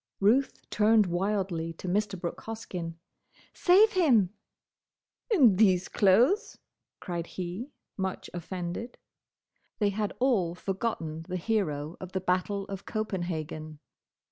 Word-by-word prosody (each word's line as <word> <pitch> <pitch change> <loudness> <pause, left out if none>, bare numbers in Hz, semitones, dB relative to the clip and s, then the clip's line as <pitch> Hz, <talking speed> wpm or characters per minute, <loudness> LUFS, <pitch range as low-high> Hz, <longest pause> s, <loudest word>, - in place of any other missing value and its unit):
Ruth 240 +8 +2
turned 215 0 +4
wildly 180 -2 -1
to 175 - -8
Mr. 200 +1 0
Brooke 170 -1 -4
Hoskyn. 180 -7 -5 0.6
"Save 400 +5 +5
him!" 250 - +4 1.0
"In 260 - +5
these 185 -4 +4
clothes!" 240 - +3 0.4
cried 170 -2 -4
he, 185 +8 -5 0.3
much 190 -1 -3
offended. 180 +6 -5 0.8
They 205 -2 +2
had 205 +1 -2
all 210 -10 +2
forgotten 180 -5 -3
the 185 - -1
hero 165 -6 -1
of 185 -1 -8
the 190 - 0
Battle 185 +2 0
of 195 -1 -7
Copenhagen. 165 -7 -3
190 Hz, 115 wpm, -29 LUFS, 175-220 Hz, 1.0 s, Save